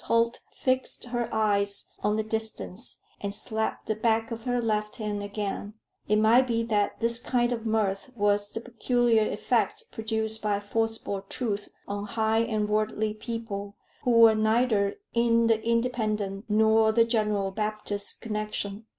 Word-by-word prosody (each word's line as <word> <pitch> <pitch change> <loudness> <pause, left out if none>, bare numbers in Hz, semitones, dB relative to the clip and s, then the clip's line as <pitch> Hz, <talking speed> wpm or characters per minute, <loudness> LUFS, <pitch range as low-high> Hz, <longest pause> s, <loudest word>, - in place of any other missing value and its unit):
Holt 230 +1 +2
fixed 260 0 -1
her 240 -1 -2
eyes 200 -2 +1
on 210 +1 +1
the 220 - 0
distance, 220 0 -5 0.2
and 200 0 -3
slapped 220 +1 -2
the 220 - 0
back 225 +1 +1
of 230 0 -6
her 245 -1 +1
left 215 -2 -1
hand 210 -2 -3
again; 205 0 -4 0.3
it 210 - +3
might 230 +4 +5
be 230 -1 +1
that 210 -3 0
this 230 0 +1
kind 245 -1 +1
of 230 -1 -4
mirth 215 0 0
was 205 -1 +2
the 225 - -5
peculiar 240 -2 +2
effect - - 0
produced 220 0 -1
by 205 -1 +1
forcible 225 -1 -2
truth 205 0 -3 0.2
on 205 0 -3
high 220 +1 +1
and 220 -2 0
worldly 215 0 0
people 215 -3 -5 0.3
who - - -1
were 230 -2 +7
neither 220 -2 +2 0.2
in 235 0 +3
the 225 -1 +2
Independent 220 -4 0
nor 220 +1 +4
the 230 +1 +4
General 210 -4 0
Baptist 210 0 -3
connection. 210 -1 -3
220 Hz, 150 wpm, -27 LUFS, 210-230 Hz, 0.3 s, were